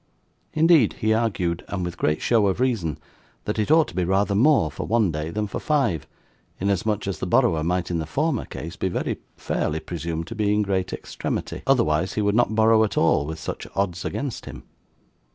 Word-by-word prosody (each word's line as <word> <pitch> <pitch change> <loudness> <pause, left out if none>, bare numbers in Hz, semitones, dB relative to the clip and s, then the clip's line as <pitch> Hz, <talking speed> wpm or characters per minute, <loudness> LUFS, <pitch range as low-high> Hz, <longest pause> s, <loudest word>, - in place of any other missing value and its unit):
Indeed 155 - +5
he 110 0 +1
argued, 100 -7 0
and 95 -3 -3
with 90 0 -5
great 75 0 0
show 110 -4 +3
of 95 +3 0
reason, 110 - 0 0.5
that 105 +1 -2
it 105 - 0
ought 160 0 +5
to - - -12
be 90 - +1
rather 95 +3 +1
more 115 - +4
for - - -5
one 110 -5 +2
day 75 +1 -3
than 105 +5 -2
for 100 - -5
five, 135 - 0 0.5
inasmuch 100 +2 0
as 95 -5 -3
the - - -3
borrower 80 -1 +3
might 90 +1 -1
in 85 - 0
the 80 - -4
former 155 - 0
case 85 +3 -7
be 95 - -1
very - - -2 0.2
fairly 80 +1 -1
presumed 85 0 -4
to - - -7
be 105 -2 0
in 105 - +2
great 95 -2 -1
extremity, - - -4
otherwise 80 +7 +2
he 110 - -1
would 100 0 +2
not 110 -1 +2
borrow 110 0 +5
at 110 - -2
all 75 -3 +3
with 80 0 -5
such 80 - -6
odds 95 -2 -1
against 140 -5 -4
him. - - -9
100 Hz, 205 wpm, -24 LUFS, 85-110 Hz, 0.5 s, Indeed